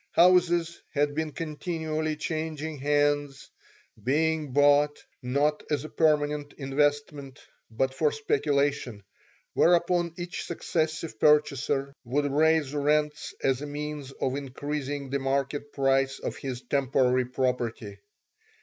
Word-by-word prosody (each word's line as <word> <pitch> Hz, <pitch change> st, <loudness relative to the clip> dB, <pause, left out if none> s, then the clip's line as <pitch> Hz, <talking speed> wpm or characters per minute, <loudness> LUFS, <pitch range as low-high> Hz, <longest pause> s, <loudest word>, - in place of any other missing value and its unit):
Houses 175 Hz, -1 st, +4 dB
had 145 Hz, -1 st, +1 dB
been 155 Hz, +1 st, -2 dB
continually 155 Hz, 0 st, -3 dB
changing 155 Hz, -1 st, -4 dB
hands, 145 Hz, 0 st, 0 dB, 0.5 s
being 155 Hz, +2 st, +1 dB
bought, 145 Hz, +1 st, +4 dB, 0.2 s
not 140 Hz, +4 st, +1 dB
as 150 Hz, -2 st, 0 dB
a -, -, -7 dB
permanent 150 Hz, -2 st, +1 dB
investment, 145 Hz, 0 st, -1 dB, 0.3 s
but 130 Hz, +4 st, -1 dB
for 150 Hz, +2 st, +1 dB
speculation, 140 Hz, -6 st, 0 dB, 0.5 s
whereupon 175 Hz, -1 st, +3 dB
each 175 Hz, 0 st, -5 dB
successive 160 Hz, -6 st, -2 dB
purchaser 140 Hz, -2 st, +2 dB
would 140 Hz, +4 st, 0 dB
raise 150 Hz, 0 st, +2 dB
rents 150 Hz, +1 st, 0 dB
as 135 Hz, 0 st, +1 dB
a 145 Hz, -, -5 dB
means 145 Hz, -1 st, -5 dB
of 130 Hz, -1 st, -2 dB
increasing 140 Hz, 0 st, -4 dB
the 140 Hz, -, 0 dB
market 140 Hz, +2 st, -2 dB
price 135 Hz, 0 st, +1 dB
of -, -, -5 dB
his 130 Hz, -2 st, -5 dB
temporary 130 Hz, -2 st, +2 dB
property. 120 Hz, -5 st, -2 dB
145 Hz, 115 wpm, -27 LUFS, 135-155 Hz, 0.5 s, Houses